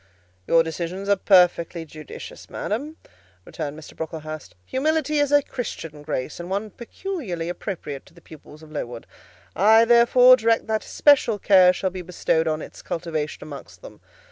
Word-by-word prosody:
"Your 165 0 +5
decisions 170 +4 -5
are 200 - +5
perfectly 180 -3 +3
judicious, 155 -2 -11
madam," 290 +10 -4 0.5
returned 150 -2 -6
Mr. 155 - -12
Brocklehurst. 155 - -7
"Humility 305 +2 0
is 290 -1 +1
a 290 -1 +5
Christian 165 - -6
grace, 145 -1 -4
and 175 +1 -7
one 205 +2 -3
peculiarly 235 - -5
appropriate 170 -7 -6
to - - -20
the - - -15
pupils 155 -1 -15
of 155 - -14
Lowood; 120 -6 -6 0.5
I, 220 +5 +6
therefore, 240 +2 +6
direct 225 0 +1
that 220 -1 -1
especial 275 -7 +3
care 185 -2 +6
shall 185 +1 -2
be 185 0 -6
bestowed 165 -2 0
on 155 -1 -1
its - - -11
cultivation 160 -3 -4
amongst 145 -2 -11
them. - - -13
180 Hz, 155 wpm, -23 LUFS, 155-230 Hz, 0.5 s, I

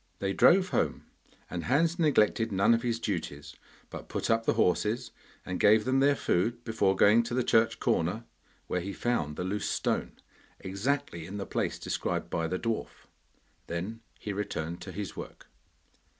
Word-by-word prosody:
They 95 0 -1
drove 185 - +5
home, - - -1 0.4
and 85 -2 -5
Hans 165 +6 +2
neglected 115 -7 +3
none 100 +4 +4
of 115 - +2
his 115 -1 -1
duties, 80 -9 -4 0.4
but - - -8
put - - -1
up 115 0 +1
the - - +3
horses 110 +7 +1 0.3
and 90 0 -3
gave 105 +1 +5
them 130 +1 +2
their 140 +1 +4
food 115 +2 0
before 105 -4 +1
going 105 +4 +6
to 115 +1 -4
the 130 - +2
church 115 -1 +3
corner, 90 +8 0 0.4
where 90 - -2
he 100 +3 -5
found 80 -12 -1
the 90 - -3
loose 100 +3 -2
stone, - - -1 0.5
exactly 95 - -2
in 100 +2 -6
the 100 - -4
place - - -2
described - - -3
by 85 -1 0
the 95 - -2
dwarf. 115 +2 -4 0.6
Then 95 +7 -4 0.2
he 105 - -5
returned 85 -5 -4
to 95 - -7
his 95 -2 -5
work. - - -9
105 Hz, 170 wpm, -29 LUFS, 90-120 Hz, 0.6 s, going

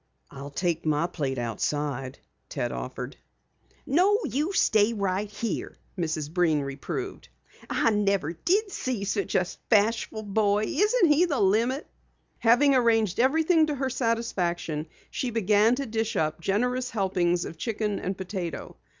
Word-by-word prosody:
"I'll 140 +1 -8
take 165 +3 -1
my 155 +1 +1
plate 145 -7 -3
outside," 130 +3 -2 0.3
Ted - - -2
offered. - - -6 0.7
"No, 370 +9 +4
you 295 - -1
stay 220 - +3
right 200 -1 -1
here," 210 +2 -4 0.2
Mrs. 160 -4 -3
Breen 165 -5 +2
reproved. 140 - -5 0.4
"I 230 - +2
never 200 -6 +1
did 390 - 0
see 255 - -3
such 200 0 -2
a 185 - +3 0.2
bashful 220 0 +2
boy! 205 0 +1
Isn't 420 - +3
he 310 +5 +5
the 290 -7 -1
limit?" 230 +9 +2 0.5
Having 250 +5 +5
arranged 225 -6 +2
everything 315 +5 +4
to 300 - -1
her 265 -1 -2
satisfaction, 180 - -1 0.2
she 255 - -2
began 220 +1 +3
to 275 +2 -3
dish 225 -1 -2
up 155 +1 -1
generous 250 +7 0
helpings 180 -4 0
of 160 - -8
chicken 210 -2 -2
and 190 0 -3
potato. 185 -3 -5
210 Hz, 140 wpm, -27 LUFS, 175-250 Hz, 0.7 s, he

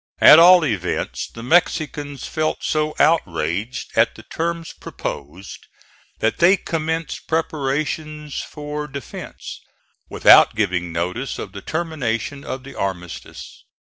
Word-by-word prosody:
At 155 - +9
all 175 0 +8
events 95 - -2
the 115 - -10
Mexicans 145 -2 0
felt 155 -1 -2
so 155 0 0
outraged 105 - 0
at 115 +1 +3
the 110 - -12
terms 165 +4 -4
proposed 80 +8 -7 0.6
that 110 - 0
they 185 +3 +6
commenced 160 -1 -3
preparations 150 -1 -2
for 150 0 -6
defence, 140 -3 -8 0.5
without - - +6
giving 90 -5 -1
notice 90 +11 -3
of - - -6
the - - -9
termination 145 -5 -3
of 130 0 -6
the 140 - -10
armistice. 90 -4 -6
145 Hz, 115 wpm, -21 LUFS, 110-160 Hz, 0.6 s, At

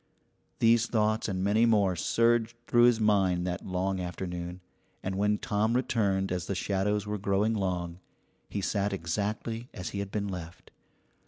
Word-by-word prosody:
These 115 0 +4
thoughts 110 -1 +1
and 95 -1 -2
many 110 +4 +3
more 100 -5 +3
surged 115 +5 +2
through 120 0 +5
his 120 -2 +4
mind 95 -5 +2
that 90 0 -4
long 95 +1 -1
afternoon, 90 0 -5 0.4
and 95 - -2
when 105 +2 +1
Tom 110 +3 0
returned 100 -7 +1
as 90 -2 -2
the 100 - -2
shadows 100 +3 0
were 105 0 -3
growing 100 +3 +1
long, 90 -4 -2 0.5
he 100 - -3
sat 100 +1 0
exactly 105 +6 -3
as 90 -5 -5
he 100 - -5
had 100 -1 -3
been 100 0 -2
left. 85 -3 -8
100 Hz, 160 wpm, -29 LUFS, 95-110 Hz, 0.5 s, through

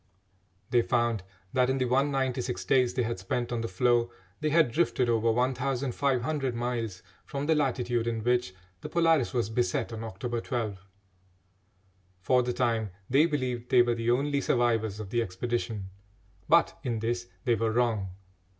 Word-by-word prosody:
They 120 - +5
found 120 -3 +1 0.3
that 125 0 +3
in 130 - +1
the 130 - +1
196 130 -1 0
days 125 -2 +3
they 125 - +1
had 115 -4 -3
spent 120 +6 -2
on 120 -1 -1
the 115 - -2
floe 120 +4 +2 0.3
they 155 - 0
had 155 -5 +4
drifted 130 -3 +1
over 115 0 +2
1500 130 +2 0
miles 115 -5 -3 0.2
from 140 0 -4
the 160 - +3
latitude 125 -5 0
in 115 -2 -2
which 120 -6 +1 0.2
the - - -7
Polaris 165 -6 +3
was 120 -5 -1
beset 120 0 0
on 110 0 -5
October 115 +2 -4
12. 110 -6 -3 1.4
For 125 +7 +3
the 125 0 -1
time 115 -4 0 0.2
they 145 +5 +5
believed 125 -5 -2
they 125 -1 +6
were 120 0 +1
the 115 0 -2
only 140 +3 +1
survivors 115 -5 +1
of 105 -2 -7
the 120 - +2
expedition, 110 -1 -3 0.6
but 170 +1 +4
in 120 -5 -2
this 120 +2 -2 0.2
they 120 - +3
were 115 0 0
wrong. 110 -5 +1
120 Hz, 160 wpm, -28 LUFS, 115-130 Hz, 1.4 s, they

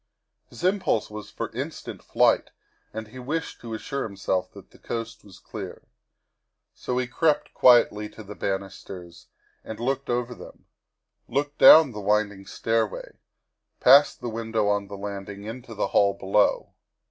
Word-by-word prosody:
His - - -12
impulse 185 - +1
was 105 -1 -8
for - - -5
instant - - -6
flight - - +2 0.4
and 110 -1 -7
he 130 +4 -11
wished 155 +6 -4
to 115 -2 -6
assure 140 +5 -4
himself 95 -4 -2
that - - -14
the - - -19
coast 115 -1 -6
was 95 -3 -15
clear. - - -8 0.9
So 125 - -4
he 125 - +1
crept 150 +5 0
quietly 110 -4 +5
to 110 - -12
the 105 +1 -9
banisters 95 -3 -6 0.4
and 110 - -8
looked 135 +3 -2
over 120 0 -1
them; - - -13 0.6
looked 145 +1 -2
down 155 -4 +9
the 105 - -7
winding 100 -1 0
stairway, 115 -2 -2 0.6
past 140 +1 +6
the 120 - -3
window 110 -1 -1
on 100 -1 0
the 100 0 -8
land 100 0 -6
ing, 100 0 -9
into 115 +2 -8
the 100 - -1
hall 100 -1 +3
below. 100 +2 +1
110 Hz, 155 wpm, -25 LUFS, 100-125 Hz, 0.9 s, down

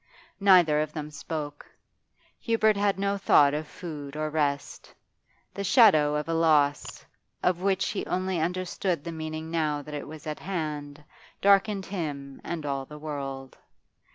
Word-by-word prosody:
Neither 180 -6 +5
of 155 0 -3
them 150 -1 -5
spoke. 150 -1 -6 0.8
Hubert 220 -2 +2
had 200 -1 +1
no 200 0 -1
thought 145 -7 +5
of 150 +1 -3
food 150 -4 -8
or 155 0 -2
rest; 145 -2 -2 0.6
the 200 - -4
shadow 185 - +5
of 150 +1 -2
a 165 - -1
loss, 150 -3 +2 0.4
of 180 -1 +1
which 195 -1 +1
he 205 - -3
only 185 -1 -1
understood 180 -1 -1
the 170 - -5
meaning 160 0 -5
now 150 -3 0
that 150 +1 -10
it 145 - -5
was 155 0 -10
at 155 -1 -4
hand, 150 -5 -4 0.4
darkened 200 0 +3
him 145 -7 -5
and 165 -3 -4
all 135 -1 -2
the 150 - -10
world. 135 -3 -6
155 Hz, 155 wpm, -27 LUFS, 150-185 Hz, 0.8 s, Neither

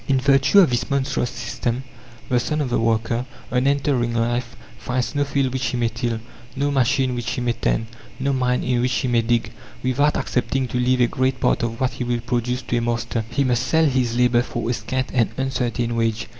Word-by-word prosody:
In 135 -1 +3
virtue 135 +7 +4
of 170 - +4
this 120 0 -1
monstrous 135 -3 0
system, 120 +2 -3 0.4
the 125 -2 +2
son 150 +6 -1
of 135 -4 -1
the - - +2
worker, 115 +2 0 0.2
on 125 +1 +2
entering 135 -4 +1
life, 120 +1 -1 0.2
finds 125 -2 -2
no 145 - +1
field 140 -2 0
which 130 -2 -1
he 125 - -2
may 120 -1 +1
till, 115 0 -2 0.4
no 145 +2 0
machine 130 -1 +2
which 120 -1 -3
he 125 - -3
may 120 -1 +1
tend, 115 - 0 0.3
no 140 +1 0
mine 125 -1 +1
in 125 -1 +1
which 125 +1 +1
he 130 - 0
may 120 -1 +3
dig, 115 -1 0 0.3
without 145 +4 +2
accepting 125 +2 -1
to 125 - -1
leave 125 +1 +2
a - - +6
great 130 +1 0
part - - +2
of 115 0 -3
what 130 -1 +1
he - - -4
will 120 -1 -1
produce 125 +1 -2
to 120 - -1
a - - +1
master. 115 -1 -1
He 140 +3 +1
must 125 -3 +1
sell 160 0 +3
his 125 -4 +1
labour 125 -1 +4
for 120 -1 -4
a 120 - +1
scant 130 +2 -3
and 120 -4 +3
uncertain 125 -3 -1
wage. 115 -1 0
125 Hz, 220 wpm, -22 LUFS, 120-130 Hz, 0.4 s, a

